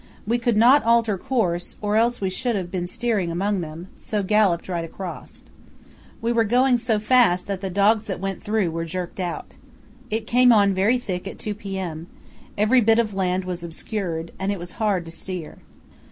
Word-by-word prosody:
We 235 +3 +1
could 235 -2 +1
not 250 +6 +6
alter 230 -2 +3
course, 180 -5 -1
or 210 0 -1
else 235 +2 +2
we 190 -2 -1
should 240 +4 -1
have 180 -3 -3
been 180 -2 -2
steering 210 -3 -1
among 190 +3 -1
them, 165 +3 -8
so 210 -2 -3
galloped 195 -4 +2
right 175 -3 -2
across. 175 +2 -8 0.8
We 230 - +1
were 230 -1 +3
going 245 +3 +3
so 230 -2 +1
fast 215 -5 +3
that 195 -2 -4
the 195 - -3
dogs 205 +4 +3
that 190 -4 -4
went 195 0 -4
through 210 -5 0
were 165 +1 -3
jerked 175 +2 -5
out. 175 -2 -4 0.6
It 220 0 -2
came 250 +2 +5
on 200 -3 +5
very 200 +7 +3
thick 190 -6 -4
at - - -7
2 210 - -4
p.m. 190 -6 -5 0.5
Every 220 +5 +4
bit 225 0 +4
of 220 -3 +1
land 185 -1 0
was 180 -1 -5
obscured, 170 -1 -4
and 195 +1 -1
it 200 - -2
was 175 0 -7
hard 200 -5 +1
to 165 - -8
steer. 180 -1 -7
200 Hz, 195 wpm, -23 LUFS, 180-225 Hz, 0.8 s, not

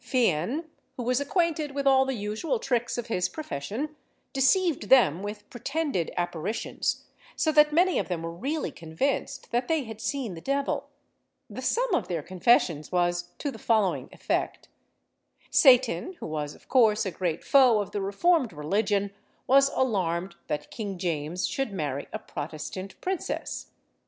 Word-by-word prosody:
Fian, 245 - +1 0.3
who 245 - -3
was 250 +3 +1
acquainted 310 -2 0
with 280 -1 -1
all 265 -1 +5
the 265 -1 -2
usual 215 - -2
tricks 245 - -1
of 240 - -3
his 180 -6 0
profession, 275 - -5 0.4
deceived 315 +5 +2
them 190 - +5
with 210 +1 -6
pretended 275 - -2
apparitions, 175 +4 -2 0.3
so 315 - +2
that 300 0 +6
many 355 +4 +3
of - - -2
them 175 -3 -3
were 165 - -3
really 280 - -2
convinced 260 - -3
that 245 +1 0
they 320 -3 +1
had 220 -2 -9
seen 265 -9 -2
the 165 - -9
devil. 275 +4 -1 0.6
The - - -6
sum - - +1
of - - +1
their 165 -4 -2
confessions 180 -5 +2
was 175 0 +1
to 285 - -3
the 225 - -10
following 215 -5 +1
effect: - - -2 0.8
Satan, 260 +6 +5
who 340 - -9
was, 150 -2 -4
of - - -21
course, 220 -5 +4
a 190 - -2
great 170 -3 -2
foe 255 -6 +5
of 205 - -3
the 205 - -2
reformed 245 - +2
religion, 200 +6 0 0.3
was 275 +1 +5
alarmed 185 -9 0
that 150 - -3
King 200 -4 -5
James 175 0 -2
should 270 -5 -2
marry 145 -7 -3
a - - -3
Protestant 155 +6 -7
princess. 375 -1 -3
225 Hz, 155 wpm, -27 LUFS, 175-275 Hz, 0.8 s, that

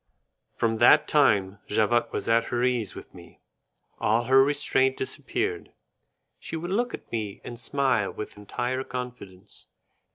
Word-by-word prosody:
From 115 -1 0
that 120 +6 +6
time 100 -9 +2
Javotte 115 +3 +1
was - - -4
at 115 0 +3
her 120 0 -1
ease 125 -4 0
with - - -11
me, - - -15 0.6
all 110 +3 +2
her 130 +2 +5
restraint 135 -2 +1
disappeared, 385 - -3 0.7
she - - -6
would 175 +3 -4
look 240 +5 0
at - - -17
me 105 -4 -4
and 120 -1 -8
smile 125 -5 +1
with 105 - -7
entire 120 +5 -3
confidence. 125 -8 -8
120 Hz, 140 wpm, -26 LUFS, 110-135 Hz, 0.7 s, that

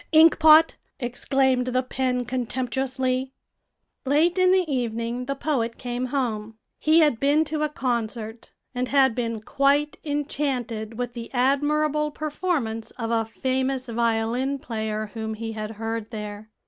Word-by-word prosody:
"Inkpot!" 315 0 +7 0.2
exclaimed 255 +1 +1
the 255 0 +1
pen 255 -1 -1
contemptuously. 255 +1 -2 0.7
Late 315 +7 +2
in 370 0 +5
the 375 -1 +4
evening 240 -2 -2
the 275 - -1
poet 260 -6 -1
came 245 0 -3
home. 225 -5 -2 0.2
He 315 +2 +5
had 295 -7 +3
been 290 +3 +3
to 305 0 -3
a 305 - +1
concert, 235 -4 -3 0.2
and 250 0 -1
had 265 -2 +4
been 230 -2 -3
quite 280 +5 +1
enchanted 265 -7 -2
with 245 -1 -3
the 235 -1 -7
admirable 300 +3 +2
performance 295 -7 -2
of 230 -2 -3
a 225 -1 +1
famous 260 +3 -1
violin 235 +4 0
player 220 -4 -4
whom 220 -1 -4
he 225 +1 -5
had 215 -1 -5
heard 225 0 -3
there. 210 -1 -7
255 Hz, 135 wpm, -25 LUFS, 230-285 Hz, 0.7 s, Inkpot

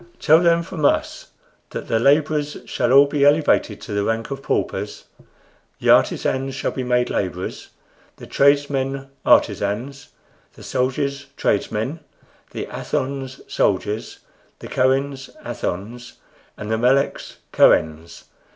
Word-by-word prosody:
Tell 155 +2 +5
them 170 -1 +3
from 165 -2 -7
us - - 0 0.4
that - - -7
the 115 - +1
laborers 150 +3 +2
shall 120 0 -1
all 140 +2 +8
be 145 0 -1
elevated 145 +2 +3
to 110 - -7
the 100 0 0
rank 115 +4 -2
of 135 0 -5
paupers, - - -3 0.8
the - - +3
artisans 135 0 +2
shall 135 - -2
be 130 - -4
made 125 0 0
laborers, 90 -1 -4 0.5
the - - -12
tradesmen 140 -1 +1
artisans, 120 +7 +1 0.5
the - - -14
soldiers 140 +2 -2
tradesmen, 130 +10 -1 0.5
the - - -5
Athons 135 -1 -4
soldiers, 105 +2 -1 0.4
the - - -10
Kohens 135 +1 0 0.2
Athons, 115 +7 -5 0.4
and 105 +1 -6
the 110 - 0
Meleks 135 +4 +1 0.2
Kohens. 80 +1 +2
135 Hz, 125 wpm, -21 LUFS, 115-140 Hz, 0.8 s, all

